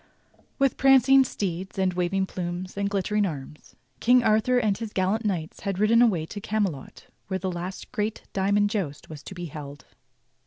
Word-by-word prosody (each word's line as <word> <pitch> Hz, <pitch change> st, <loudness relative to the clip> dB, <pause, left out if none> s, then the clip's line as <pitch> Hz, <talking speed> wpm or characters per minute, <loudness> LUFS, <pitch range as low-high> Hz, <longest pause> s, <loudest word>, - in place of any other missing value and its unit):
^ 275 Hz, -, +5 dB
^f^ITH 270 Hz, -, 0 dB
prancing 270 Hz, 0 st, +6 dB
steeds 190 Hz, -5 st, -4 dB
and 190 Hz, -1 st, +1 dB
waving 180 Hz, +2 st, 0 dB
plumes 180 Hz, 0 st, -5 dB
and 200 Hz, 0 st, -1 dB
glittering 205 Hz, +1 st, 0 dB
arms, 150 Hz, -5 st, -6 dB, 0.2 s
King 245 Hz, +1 st, +5 dB
Arthur 220 Hz, +4 st, +3 dB
and 215 Hz, -5 st, +1 dB
his 225 Hz, -2 st, -6 dB
gallant 195 Hz, +4 st, 0 dB
knights 175 Hz, -6 st, -2 dB
had 195 Hz, -2 st, -3 dB
ridden 220 Hz, +3 st, +4 dB
away 190 Hz, -10 st, +3 dB
to 205 Hz, +5 st, -8 dB
Camelot 200 Hz, -10 st, -3 dB, 0.2 s
where 190 Hz, 0 st, -1 dB
the 190 Hz, 0 st, -3 dB
last 180 Hz, +2 st, -6 dB
great 215 Hz, -2 st, -2 dB
"diamond 200 Hz, +1 st, +2 dB
joust" 165 Hz, -10 st, -4 dB
was 150 Hz, -2 st, -8 dB
to 190 Hz, -, -10 dB
be 175 Hz, -1 st, -5 dB
held. 145 Hz, -2 st, -9 dB
195 Hz, 180 wpm, -26 LUFS, 175-215 Hz, 0.2 s, prancing